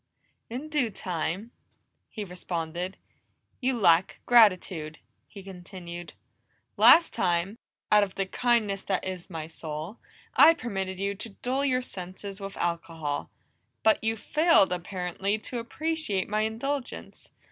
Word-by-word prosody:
"In 255 +6 -5
due 295 -6 +1
time," 185 +2 -3 0.6
he 215 - -5
responded. 180 0 -4 0.6
"You 260 -1 0
lack 170 -2 +4
gratitude," 185 -9 +4 0.3
he 200 -3 -11
continued. 180 -2 -9 0.6
"Last 335 - +7
time, 180 +4 0 0.3
out 210 - +7
of 195 -2 -4
the 195 - 0
kindness 215 -2 +1
that 190 -2 -1
is 185 -1 -5
my 160 -3 -5
soul, 160 +4 -7 0.4
I 330 - +8
permitted 190 - -4
you 200 +1 0
to 210 +3 -7
dull 255 +6 -2
your 255 -2 +1
senses 195 0 -7
with 195 0 -7
alcohol, 165 -4 -3 0.5
but 220 0 +4
you 225 0 0
failed, 300 - +4
apparently, 180 +3 -2
to 240 +3 -5
appreciate 305 - -2
my 215 +1 0
indulgence. 245 +5 -4
195 Hz, 125 wpm, -27 LUFS, 180-230 Hz, 0.6 s, I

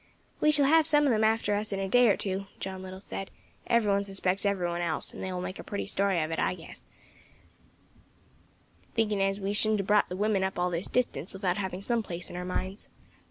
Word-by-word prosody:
"We 305 - +4
shall 290 -2 +4
have 320 +2 +5
some 295 -2 +5
of 275 - +4
them 220 -1 +2
after 220 -1 +2
us 210 +1 -1
in 195 - -2
a 195 - -1
day 245 +4 +5
or 200 - +3
two," 195 0 -3
John 190 -1 -5
Little 190 0 -8
said; 195 -1 -5 0.4
"every 230 -3 +3
one 200 0 +2
suspects 195 0 0
every 190 -3 0
one 175 0 -2
else; 170 -2 -2
and - - -8
they 190 - -3
will 180 -1 -3
make 185 +1 -5
a - - -6
pretty 200 - -4
story 195 -2 +1
of 155 - -4
it, 160 - -2
I - - +1
guess, 165 - -12 2.1
thinking 215 -3 +1
as 195 +1 +1
we 200 +1 -2
shouldn't 215 0 +2
have - - -7
brought 210 +1 +3
the 180 - -4
women 205 -1 +1
up 190 0 -2
all 180 0 +1
this 170 +2 -1
distance 195 - -1
without 190 -2 -1
having 190 -1 -4
some 235 +1 +1
place 175 -4 -5
in - - -8
our 180 - -4
minds." 185 +2 -4
195 Hz, 235 wpm, -29 LUFS, 185-215 Hz, 2.1 s, have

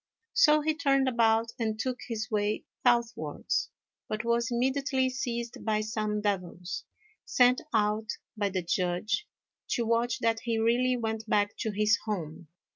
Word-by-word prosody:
So 305 -11 +5
he 310 +1 +1
turned 275 -4 +2
about 230 -2 +3
and 220 -2 -1
took 255 +1 -2
his 225 -1 -4
way 210 0 0 0.2
southwards, 235 -1 +1 0.4
but 215 +2 -3
was 235 +1 +1
immediately 260 +1 +1
seized 235 -2 -4
by 215 -1 +1
some 215 -1 -2
devils, 180 -3 -3 0.4
sent 250 0 +4
out 215 0 +1 0.3
by 205 -2 0
the 185 -2 -2
Judge 180 - -1 0.5
to 235 - 0
watch 235 +1 +1
that 230 -2 +1
he 230 -1 -1
really 245 +3 +2
went 220 -1 -3
back 205 0 +2
to 220 - -1
his 210 +2 +2
home. 170 -6 -4
225 Hz, 145 wpm, -29 LUFS, 210-245 Hz, 0.5 s, So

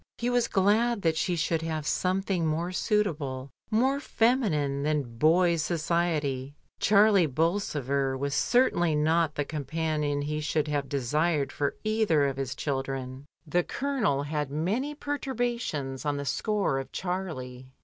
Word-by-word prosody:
He 245 +1 -1
was 245 -1 +2
glad 210 +3 +2
that 165 -1 +2
she 175 +2 0
should 165 0 0
have 160 -2 -3
some 185 +4 0
thing 180 -5 0
more 165 +3 -1
suitable, 150 - -1 0.2
more 260 +5 +2
feminine 210 - +1
than 140 -6 -2
boys' 170 +2 +4
society. 155 -4 -1 0.2
Charlie 205 -4 +5
Bolsover 140 -4 0
was 140 +1 -2
certainly 175 - +2
not 160 +1 +2
the 145 - -1
companion 150 0 -2
he 150 +1 -2
should 150 0 0
have 145 -2 -2
desired 145 +2 0
for 145 -1 -1
either 215 -9 +2
of 135 -1 -2
his 135 0 -3
children. 135 -1 -4 0.2
The 175 +3 +2
Colonel 240 - -1
had 150 -1 -2
many 205 - -1
perturbations 240 - -3
on 145 -1 -1
the 140 - -4
score 195 0 0
of 135 - -7
Charlie. 140 -9 -4
155 Hz, 140 wpm, -28 LUFS, 140-195 Hz, 0.2 s, Charlie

